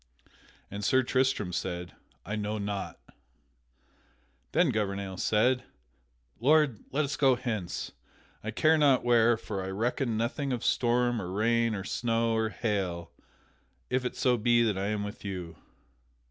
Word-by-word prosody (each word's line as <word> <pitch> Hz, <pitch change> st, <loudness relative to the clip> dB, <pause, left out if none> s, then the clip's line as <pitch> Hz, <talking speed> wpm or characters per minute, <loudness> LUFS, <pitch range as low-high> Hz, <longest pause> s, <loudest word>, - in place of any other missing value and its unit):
And 100 Hz, +1 st, -5 dB
Sir 130 Hz, +5 st, +3 dB
Tristram 130 Hz, -7 st, 0 dB
said, 90 Hz, -1 st, -4 dB, 0.3 s
"I 105 Hz, -, -3 dB
know 105 Hz, 0 st, -2 dB
not." 100 Hz, -1 st, -4 dB, 1.5 s
Then 170 Hz, -6 st, +3 dB
Gouvernail 100 Hz, -3 st, -2 dB
said: 125 Hz, +6 st, +2 dB, 0.8 s
"Lord, 145 Hz, -2 st, +3 dB
let 150 Hz, +2 st, +1 dB
us 145 Hz, +1 st, -3 dB
go 135 Hz, -3 st, +4 dB
hence, 110 Hz, -8 st, -4 dB, 0.5 s
I 110 Hz, -, -3 dB
care 155 Hz, +8 st, +3 dB
not 140 Hz, -3 st, +4 dB
where, 120 Hz, -1 st, +4 dB
for 100 Hz, -4 st, -5 dB
I 95 Hz, -, -4 dB
reckon 115 Hz, +3 st, -1 dB
nothing 130 Hz, +5 st, -1 dB
of 120 Hz, -, -3 dB
storm 120 Hz, -1 st, +2 dB
or 90 Hz, -, -5 dB
rain 115 Hz, +2 st, +1 dB
or 95 Hz, -, -4 dB
snow 115 Hz, +1 st, 0 dB
or 110 Hz, 0 st, +1 dB
hail 95 Hz, -6 st, -2 dB, 0.8 s
if 130 Hz, 0 st, +1 dB
it 125 Hz, -, -3 dB
so 125 Hz, -1 st, +2 dB
be 120 Hz, +1 st, +3 dB
that 110 Hz, -3 st, +1 dB
I 95 Hz, +1 st, -2 dB
am 105 Hz, -1 st, -1 dB
with 105 Hz, 0 st, -7 dB
you." 90 Hz, -5 st, -5 dB
115 Hz, 145 wpm, -29 LUFS, 100-125 Hz, 1.5 s, go